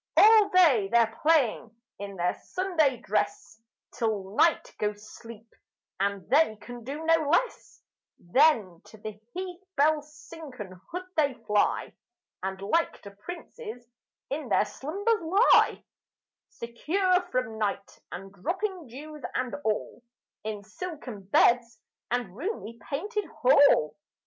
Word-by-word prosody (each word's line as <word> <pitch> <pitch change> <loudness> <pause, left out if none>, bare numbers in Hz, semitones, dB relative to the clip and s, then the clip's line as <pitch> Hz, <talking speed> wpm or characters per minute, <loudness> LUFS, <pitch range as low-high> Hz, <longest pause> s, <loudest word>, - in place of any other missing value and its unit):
All 430 -1 +7
day 300 - +5
they're 230 -1 +3
playing 255 -7 +2 0.2
in 200 -1 -6
their 175 0 0
Sunday 325 -8 0
dress 405 - -2 0.3
Till 210 -3 -2
night 330 +5 +3
goes 210 0 -3
sleep, 230 -1 -12 0.5
and 200 -2 -1
they 275 -1 +4
can 240 +2 -10
do 290 +6 -6
no 325 -2 +3
less; 485 +10 -1 0.3
Then, 205 - +2
to 220 - -15
the 210 0 -8
heath 365 0 -6
bell's 300 +1 +2
silken 255 - -10
hood 360 +2 -4
they 285 -4 +2
fly, 210 0 +1 0.5
And 190 0 -4
like 330 +12 0
to 200 - -9
princes 340 - -9 0.5
in 280 -2 -3
their 205 - +3
slumbers 400 - -1
lie, 385 +9 +4 0.7
Secure 360 +11 0
from 250 -3 -2
night, 200 -2 -3
and 195 +1 -8
dropping 360 - -3
dews, 300 +5 -10
and 255 -1 -1
all, 215 +2 -2 0.4
In 210 -1 -5
silken 245 - -8
beds 230 +3 +3 0.3
and 240 -6 -2
roomy 255 - -5
painted 410 +9 -2
hall. 280 - +4
255 Hz, 125 wpm, -28 LUFS, 215-330 Hz, 0.7 s, All